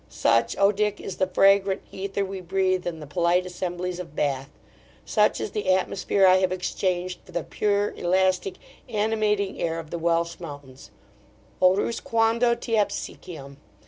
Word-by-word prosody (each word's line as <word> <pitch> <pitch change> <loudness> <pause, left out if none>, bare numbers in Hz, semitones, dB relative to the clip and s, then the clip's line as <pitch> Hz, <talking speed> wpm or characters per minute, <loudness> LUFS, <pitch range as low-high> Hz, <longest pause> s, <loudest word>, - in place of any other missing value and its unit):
Such, 115 0 +1
O 200 +1 +5
Dick! 210 0 -1
is 190 - -6
the 185 - +1
fragrant 195 +1 +3
aether 195 +1 -2
we 190 0 -6
breathe 185 0 0
in 165 -2 -4
the 150 - -8
polite 175 +4 +1
assemblies 180 0 -4
of 165 -5 -8
Bath 140 -2 -1 0.6
Such 210 -1 +2
is - - -3
the 210 -3 -2
atmosphere 190 +1 +2
I 185 0 +7
have 185 -1 +1
exchanged 180 0 -2
for - - -16
the 175 -2 -2
pure, 205 0 0
elastic, 185 +1 +1 0.3
animating 210 -2 0
air 165 -1 -1
of 165 -2 -8
the 170 - -3
Welsh 170 0 0
mountains 145 -5 -10 0.7
O 185 0 +6
Rus, 230 +3 -1
quando 230 +1 +2
te 235 -1 -2
aspiciam! 155 -8 -4
185 Hz, 160 wpm, -25 LUFS, 170-200 Hz, 0.7 s, I